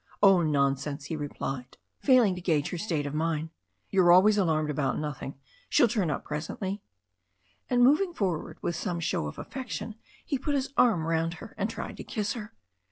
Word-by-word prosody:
"Oh, 195 Hz, -3 st, +7 dB
nonsense!" 140 Hz, -1 st, 0 dB
he 160 Hz, -, -3 dB
replied, 135 Hz, -3 st, -5 dB, 0.2 s
failing 250 Hz, -8 st, +5 dB
to 180 Hz, -, -6 dB
gauge 155 Hz, -5 st, +1 dB
her 180 Hz, -, -4 dB
state 160 Hz, -7 st, -1 dB
of 145 Hz, -, -4 dB
mind. 160 Hz, 0 st, -1 dB, 0.4 s
"You're 185 Hz, -3 st, +5 dB
always 195 Hz, +4 st, +7 dB
alarmed 155 Hz, -6 st, +1 dB
about 140 Hz, -1 st, 0 dB
nothing. 150 Hz, -2 st, -4 dB, 0.3 s
She'll 240 Hz, -, +5 dB
turn 205 Hz, -6 st, 0 dB
up -, -, -2 dB
presently." 185 Hz, +6 st, -4 dB, 0.9 s
And 245 Hz, -1 st, +4 dB
moving 305 Hz, +9 st, +4 dB
forward 190 Hz, -, -2 dB
with 170 Hz, -, -1 dB
some 170 Hz, +1 st, -2 dB
show 155 Hz, -, -1 dB
of 75 Hz, -, -8 dB
affection, 250 Hz, -4 st, -5 dB, 0.3 s
he 275 Hz, -, -1 dB
put 285 Hz, +2 st, -1 dB
his 270 Hz, 0 st, -2 dB
arm 205 Hz, -10 st, +4 dB
round 165 Hz, +1 st, 0 dB
her -, -, -11 dB
and -, -, -1 dB
tried -, -, -6 dB
to -, -, -6 dB
kiss 210 Hz, -3 st, -2 dB
her. 225 Hz, -2 st, -8 dB
170 Hz, 180 wpm, -28 LUFS, 150-210 Hz, 0.9 s, Oh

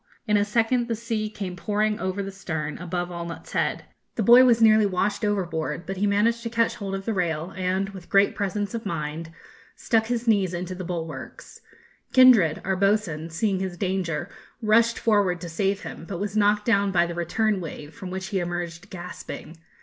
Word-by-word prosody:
In 210 Hz, -2 st, +2 dB
a 205 Hz, -, +4 dB
second 230 Hz, +3 st, +1 dB
the 230 Hz, -, -1 dB
sea 220 Hz, -1 st, -3 dB
came 195 Hz, -4 st, -5 dB
pouring 210 Hz, +4 st, 0 dB
over 190 Hz, 0 st, -2 dB
the 195 Hz, -, -5 dB
stern, 160 Hz, -6 st, -4 dB
above 175 Hz, 0 st, -3 dB
Allnutt's 170 Hz, -1 st, -7 dB
head. -, -, -1 dB, 0.3 s
The 225 Hz, -, 0 dB
boy 240 Hz, +5 st, +8 dB
was 235 Hz, -2 st, +5 dB
nearly 215 Hz, -2 st, +6 dB
washed 200 Hz, +2 st, -1 dB
overboard, 170 Hz, -6 st, -1 dB
but 195 Hz, 0 st, -5 dB
he 205 Hz, +2 st, +1 dB
managed 220 Hz, +4 st, +2 dB
to 230 Hz, -, -4 dB
catch 230 Hz, 0 st, +1 dB
hold 195 Hz, -3 st, -4 dB
of 195 Hz, 0 st, -6 dB
the 225 Hz, -, 0 dB
rail, 170 Hz, -2 st, -2 dB
and, 185 Hz, +1 st, -1 dB
with 190 Hz, -3 st, -11 dB
great 200 Hz, 0 st, +4 dB
presence 205 Hz, +1 st, -2 dB
of 230 Hz, -1 st, -4 dB
mind, 160 Hz, -2 st, -4 dB, 0.4 s
stuck 225 Hz, -1 st, +1 dB
his 240 Hz, 0 st, -2 dB
knees 195 Hz, -5 st, +2 dB
into 180 Hz, +1 st, -4 dB
the 185 Hz, 0 st, -6 dB
bulwarks. 165 Hz, -2 st, -7 dB, 0.5 s
Kindred, 245 Hz, -11 st, +6 dB
our 190 Hz, 0 st, +1 dB
boatswain, 185 Hz, -5 st, 0 dB
seeing 190 Hz, +3 st, 0 dB
his 185 Hz, -2 st, -4 dB
danger, 180 Hz, -5 st, -2 dB, 0.3 s
rushed 230 Hz, +1 st, +3 dB
forward 200 Hz, -5 st, +2 dB
to 175 Hz, -, -6 dB
save 195 Hz, +4 st, 0 dB
him, -, -, -8 dB
but 180 Hz, -3 st, -5 dB
was 205 Hz, 0 st, -3 dB
knocked 210 Hz, 0 st, +3 dB
down 200 Hz, -3 st, +3 dB
by 175 Hz, -2 st, +3 dB
the 170 Hz, -, -4 dB
return 190 Hz, +4 st, 0 dB
wave, 150 Hz, -2 st, -8 dB
from 190 Hz, -, -8 dB
which 190 Hz, +1 st, -5 dB
he 200 Hz, -3 st, 0 dB
emerged 175 Hz, +1 st, -4 dB
gasping. 175 Hz, -3 st, -8 dB
195 Hz, 195 wpm, -25 LUFS, 175-215 Hz, 0.5 s, boy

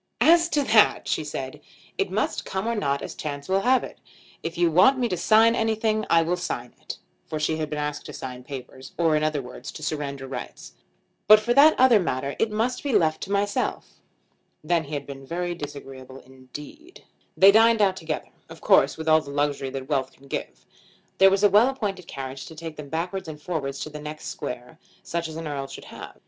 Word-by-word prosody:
"As 335 Hz, +1 st, +5 dB
to 295 Hz, -3 st, +1 dB
that," 220 Hz, -3 st, +4 dB
she -, -, 0 dB
said, 135 Hz, -3 st, -6 dB, 0.3 s
"it -, -, -1 dB
must -, -, -1 dB
come 190 Hz, +2 st, -4 dB
or 235 Hz, -, +1 dB
not 140 Hz, -10 st, -1 dB
as -, -, -6 dB
chance 145 Hz, -2 st, -6 dB
will 190 Hz, +1 st, +2 dB
have 255 Hz, +4 st, +3 dB
it. -, -, -9 dB, 0.4 s
If 165 Hz, +1 st, -5 dB
you 170 Hz, -1 st, +3 dB
want 190 Hz, -, +5 dB
me 250 Hz, -2 st, +1 dB
to 185 Hz, -, -1 dB
sign 220 Hz, +6 st, +5 dB
anything 220 Hz, -1 st, 0 dB
I 165 Hz, 0 st, +5 dB
will 175 Hz, +2 st, -1 dB
sign 125 Hz, -8 st, -5 dB
it;" -, -, -7 dB, 0.3 s
for 155 Hz, -, -4 dB
she 155 Hz, +1 st, 0 dB
had 155 Hz, -1 st, -3 dB
been 150 Hz, -, -4 dB
asked 150 Hz, 0 st, -4 dB
to -, -, -8 dB
sign 125 Hz, -1 st, -7 dB
papers, 130 Hz, -1 st, -9 dB
or 165 Hz, -2 st, +3 dB
in 150 Hz, -, +1 dB
other 155 Hz, -3 st, 0 dB
words 125 Hz, +2 st, -9 dB
to 155 Hz, -, -9 dB
surrender 145 Hz, -3 st, -3 dB
rights; 130 Hz, -, -8 dB, 0.5 s
"but 215 Hz, +1 st, +9 dB
for 235 Hz, +3 st, 0 dB
that 295 Hz, +4 st, +6 dB
other 250 Hz, -4 st, +6 dB
matter 140 Hz, -5 st, -2 dB
it 225 Hz, -, +2 dB
must 225 Hz, +4 st, -1 dB
be 280 Hz, -3 st, -2 dB
left 160 Hz, -6 st, +2 dB
to 195 Hz, -, -6 dB
myself." 205 Hz, 0 st, -2 dB, 0.6 s
Then 165 Hz, 0 st, +1 dB
he 150 Hz, +1 st, -5 dB
had 140 Hz, -, -4 dB
been 135 Hz, -1 st, -9 dB
very 175 Hz, +5 st, -3 dB
disagreeable 135 Hz, -4 st, -9 dB
indeed. 145 Hz, -, -13 dB, 0.3 s
They 195 Hz, +1 st, +8 dB
dined 225 Hz, +2 st, +5 dB
out 195 Hz, -3 st, +3 dB
together, 160 Hz, -4 st, -5 dB, 0.2 s
of -, -, -11 dB
course -, -, +4 dB
with 160 Hz, 0 st, -6 dB
all 155 Hz, 0 st, +5 dB
the 145 Hz, -, -11 dB
luxury 140 Hz, -1 st, -1 dB
that 130 Hz, 0 st, -6 dB
wealth 135 Hz, -3 st, -1 dB
can 140 Hz, -, -20 dB
give. -, -, -6 dB, 0.5 s
There 195 Hz, 0 st, +8 dB
was 195 Hz, +1 st, +1 dB
a -, -, +8 dB
well 215 Hz, +6 st, +6 dB
appointed 200 Hz, -9 st, -4 dB
carriage 135 Hz, -1 st, -7 dB
to 160 Hz, -, -11 dB
take 160 Hz, 0 st, -7 dB
them 150 Hz, -2 st, -9 dB
backwards 180 Hz, +4 st, -3 dB
and 155 Hz, -2 st, -8 dB
forwards 145 Hz, -5 st, -4 dB
to -, -, -4 dB
the 150 Hz, 0 st, -8 dB
next 150 Hz, +1 st, -7 dB
square, 125 Hz, +6 st, -7 dB, 0.2 s
such 170 Hz, 0 st, -3 dB
as 160 Hz, -, -8 dB
an 165 Hz, -1 st, -5 dB
Earl 140 Hz, -2 st, -4 dB
should -, -, -10 dB
have. -, -, -10 dB
160 Hz, 215 wpm, -25 LUFS, 140-205 Hz, 0.6 s, but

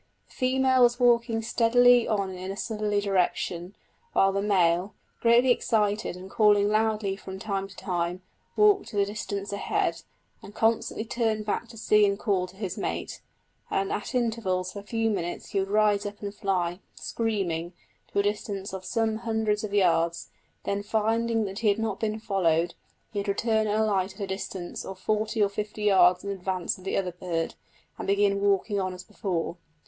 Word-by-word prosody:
The -, -, -20 dB
female 260 Hz, 0 st, +2 dB
was 240 Hz, 0 st, +4 dB
walking 235 Hz, -2 st, +3 dB
steadily 240 Hz, +1 st, +5 dB
on 200 Hz, -3 st, 0 dB
in 185 Hz, 0 st, -6 dB
a 195 Hz, -, -6 dB
southerly 210 Hz, -2 st, -1 dB
direction, 185 Hz, -2 st, -1 dB, 0.4 s
while 195 Hz, -, +4 dB
the 200 Hz, +1 st, -1 dB
male, 185 Hz, -2 st, +2 dB, 0.2 s
greatly 240 Hz, +2 st, +5 dB
excited, 210 Hz, -5 st, +1 dB
and 185 Hz, +1 st, -9 dB
calling 205 Hz, 0 st, +4 dB
loudly 215 Hz, -2 st, +1 dB
from 190 Hz, -1 st, -8 dB
time 195 Hz, -1 st, -3 dB
to 195 Hz, -, -15 dB
time, 175 Hz, 0 st, -2 dB, 0.3 s
walked 410 Hz, -, +3 dB
at -, -, +2 dB
a 200 Hz, -, +4 dB
distance 200 Hz, -1 st, -4 dB
ahead, 200 Hz, -, -1 dB, 0.4 s
and 205 Hz, -, -12 dB
constantly 225 Hz, 0 st, +1 dB
turned 225 Hz, -3 st, -1 dB
back 215 Hz, +3 st, -2 dB
to 230 Hz, 0 st, -13 dB
see 210 Hz, -1 st, +4 dB
and 200 Hz, 0 st, 0 dB
call 195 Hz, -4 st, 0 dB
to 180 Hz, -, -16 dB
his 195 Hz, -2 st, -4 dB
mate, -, -, -4 dB, 0.5 s
and 195 Hz, 0 st, 0 dB
at 210 Hz, -, -4 dB
intervals 215 Hz, -7 st, -1 dB
of 200 Hz, -, -6 dB
a -, -, -27 dB
few 225 Hz, 0 st, 0 dB
minutes 175 Hz, -4 st, -4 dB
he 200 Hz, -, +1 dB
would 195 Hz, 0 st, -1 dB
rise 210 Hz, -1 st, +3 dB
up 205 Hz, 0 st, -6 dB
and 200 Hz, 0 st, -4 dB
fly, 185 Hz, -4 st, -1 dB, 0.2 s
screaming, 185 Hz, -7 st, -2 dB, 0.4 s
to -, -, -5 dB
a 200 Hz, -, +4 dB
distance 205 Hz, -1 st, -3 dB
of 190 Hz, -1 st, -5 dB
some 225 Hz, +1 st, 0 dB
hundreds 220 Hz, -2 st, -1 dB
of 215 Hz, -, -4 dB
yards; 170 Hz, -4 st, +1 dB, 0.3 s
then 200 Hz, 0 st, -1 dB
finding 225 Hz, +1 st, +1 dB
that 195 Hz, +1 st, -5 dB
he 225 Hz, -, 0 dB
had 200 Hz, 0 st, +4 dB
not 220 Hz, -3 st, -2 dB
been 220 Hz, 0 st, -1 dB
followed, 175 Hz, -6 st, +1 dB, 0.4 s
he 205 Hz, -, -1 dB
would 200 Hz, -, -4 dB
return 220 Hz, +2 st, +1 dB
and 210 Hz, +1 st, +1 dB
alight 195 Hz, -3 st, +1 dB
at 205 Hz, -, -10 dB
a -, -, 0 dB
distance 190 Hz, -2 st, -5 dB
of 190 Hz, -, -7 dB
forty 215 Hz, +3 st, 0 dB
or -, -, +4 dB
fifty 210 Hz, +1 st, -5 dB
yards 180 Hz, -3 st, +5 dB
in 200 Hz, -, -3 dB
advance 185 Hz, -2 st, -2 dB
of 185 Hz, -, -15 dB
the -, -, -1 dB
other 185 Hz, -2 st, -1 dB
bird, 170 Hz, -2 st, -3 dB, 0.5 s
and -, -, -5 dB
begin 200 Hz, 0 st, +2 dB
walking 200 Hz, +1 st, +1 dB
on 185 Hz, -1 st, -2 dB
as 180 Hz, -, -9 dB
before. 175 Hz, -3 st, -3 dB
205 Hz, 185 wpm, -27 LUFS, 190-220 Hz, 0.5 s, steadily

